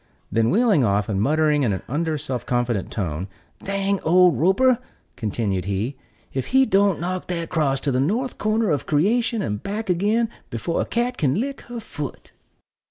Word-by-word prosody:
Then 115 Hz, 0 st, +2 dB
wheeling 210 Hz, -, +3 dB
off, 100 Hz, -1 st, +1 dB
and 100 Hz, -2 st, 0 dB
muttering 150 Hz, +3 st, +2 dB
in 115 Hz, -7 st, +2 dB
an 95 Hz, -, -4 dB
under, 155 Hz, +3 st, -1 dB
self 130 Hz, -5 st, -4 dB
confident 120 Hz, -5 st, -1 dB
tone, 90 Hz, -3 st, -3 dB, 0.4 s
"Dang 195 Hz, 0 st, 0 dB
old 180 Hz, -1 st, +5 dB
Roper," 235 Hz, -, +4 dB, 0.4 s
continued 100 Hz, -4 st, -2 dB
he, 100 Hz, +7 st, -2 dB, 0.4 s
"if 130 Hz, -2 st, -2 dB
he 265 Hz, +1 st, +4 dB
don't 200 Hz, -4 st, +3 dB
knock 180 Hz, +2 st, -3 dB
that 170 Hz, -2 st, -3 dB
cross 145 Hz, -6 st, +1 dB
to 140 Hz, -, 0 dB
the 125 Hz, -, +1 dB
north 225 Hz, -, -1 dB
corner 215 Hz, -2 st, +1 dB
of 145 Hz, -, -1 dB
creation 225 Hz, -, +2 dB
and 105 Hz, -1 st, -3 dB
back 205 Hz, -1 st, -2 dB
again 210 Hz, +6 st, +2 dB, 0.2 s
before 120 Hz, +9 st, -2 dB
a -, -, -1 dB
cat 240 Hz, +1 st, -1 dB
can 140 Hz, -2 st, +1 dB
lick 270 Hz, +7 st, -2 dB
her 240 Hz, -1 st, -5 dB
foot." 150 Hz, -10 st, -7 dB
160 Hz, 175 wpm, -23 LUFS, -, 0.4 s, old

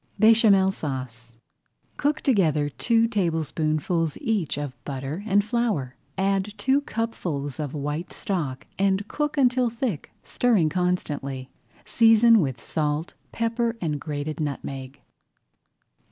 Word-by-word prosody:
BÉCHAMEL 215 Hz, -3 st, +6 dB
SAUCE 125 Hz, -8 st, -6 dB, 0.6 s
Cook 295 Hz, +1 st, 0 dB
together 160 Hz, -, +2 dB
two 230 Hz, -, +2 dB
tablespoonfuls 165 Hz, -, 0 dB
each 200 Hz, -11 st, -1 dB
of 145 Hz, -3 st, -4 dB
butter 140 Hz, +6 st, -5 dB
and 200 Hz, 0 st, +3 dB
flour, 215 Hz, -, -1 dB, 0.2 s
add 195 Hz, +1 st, 0 dB
two 265 Hz, +7 st, +2 dB
cupfuls 175 Hz, -, -3 dB
of 150 Hz, -1 st, -3 dB
white 150 Hz, +4 st, -3 dB
stock 150 Hz, -10 st, -3 dB
and 195 Hz, +1 st, +1 dB
cook 295 Hz, +3 st, -2 dB
until 250 Hz, -2 st, +3 dB
thick, 230 Hz, -, -3 dB
stirring 215 Hz, -11 st, +2 dB
constantly. 145 Hz, -7 st, -2 dB, 0.3 s
Season 225 Hz, 0 st, +6 dB
with 135 Hz, -8 st, -1 dB
salt, 150 Hz, +1 st, -2 dB, 0.2 s
pepper, 230 Hz, 0 st, -1 dB
and 150 Hz, -6 st, -2 dB
grated 150 Hz, 0 st, -4 dB
nutmeg. 135 Hz, -2 st, -5 dB
180 Hz, 110 wpm, -25 LUFS, 145-225 Hz, 0.6 s, BÉCHAMEL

